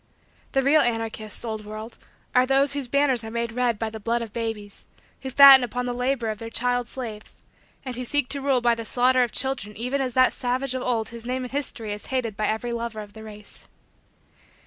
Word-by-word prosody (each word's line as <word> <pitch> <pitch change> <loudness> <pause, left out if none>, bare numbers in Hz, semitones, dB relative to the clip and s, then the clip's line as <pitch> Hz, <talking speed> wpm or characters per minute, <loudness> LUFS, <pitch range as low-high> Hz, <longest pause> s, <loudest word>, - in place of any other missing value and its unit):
The 270 - +2
real 295 +3 +5
anarchists, 225 -1 -2
old 220 -2 -4
world, 215 +2 -8 0.3
are 250 0 +4
those 275 +1 +3
whose 280 -3 -3
banners 270 -3 +2
are 220 - -6
made 235 0 -2
red 240 -1 0
by 220 +1 -3
the 220 - -7
blood 235 +2 -1
of 225 - -9
babies; 220 -3 -5 0.3
who 265 - -5
fatten 270 0 +9
upon 245 +1 -3
the 245 - -2
labor 245 -2 -1
of 215 - -7
their 225 - -6
child 245 +1 0
slaves; 225 -5 -8 0.4
and 255 -2 -5
who 250 - -4
seek 290 +2 +1
to 280 - 0
rule 270 -2 +2
by 235 0 +3
the 230 0 -4
slaughter 250 +3 +3
of 240 -2 +1
children 250 -6 -1
even 250 +5 -1
as 255 -3 -3
that 255 0 +5
savage 255 +1 -1
of 260 - -3
old 235 -3 -1
whose 235 0 -9
name 255 +1 -2
in 250 - -7
history 240 -6 -3
is 205 - -8
hated 250 -5 -2
by 215 0 -1
every 220 +3 -2
lover 235 -2 -4
of 205 -1 -12
the 220 - -11
race. 210 -1 -11
240 Hz, 220 wpm, -24 LUFS, 220-255 Hz, 0.4 s, fatten